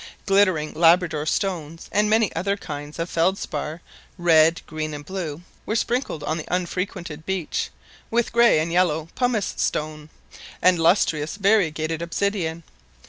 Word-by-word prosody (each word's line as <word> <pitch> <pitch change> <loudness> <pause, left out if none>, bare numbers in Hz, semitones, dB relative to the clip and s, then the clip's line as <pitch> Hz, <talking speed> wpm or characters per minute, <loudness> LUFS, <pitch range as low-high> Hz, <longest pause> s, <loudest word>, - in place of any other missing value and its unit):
Glittering 190 -6 +2
Labrador 165 -2 +3
stones, 165 -4 -2
and 210 +1 +2
many 220 -1 +2
other 200 +2 0
kinds 145 -4 -7
of 165 0 -2
felspar, 165 -3 -1 0.4
red, 165 -2 +4
green, 155 -1 -4
and 145 0 -9
blue, 170 -3 -5 0.2
were 215 - -2
sprinkled 235 - -1
on 155 +2 -1
the - - -7
unfrequented 180 -3 -3
beach, 190 -2 -2 0.4
with 235 0 0
grey 235 -7 +5
and 160 +2 -1
yellow 165 -3 +1
pummice 245 -6 0
stone, 150 0 -2 0.5
and 180 -2 +4
lustrous 165 -2 +2
variegated 165 -6 +1
obsidian. 170 -2 -2
170 Hz, 135 wpm, -23 LUFS, 155-195 Hz, 0.5 s, grey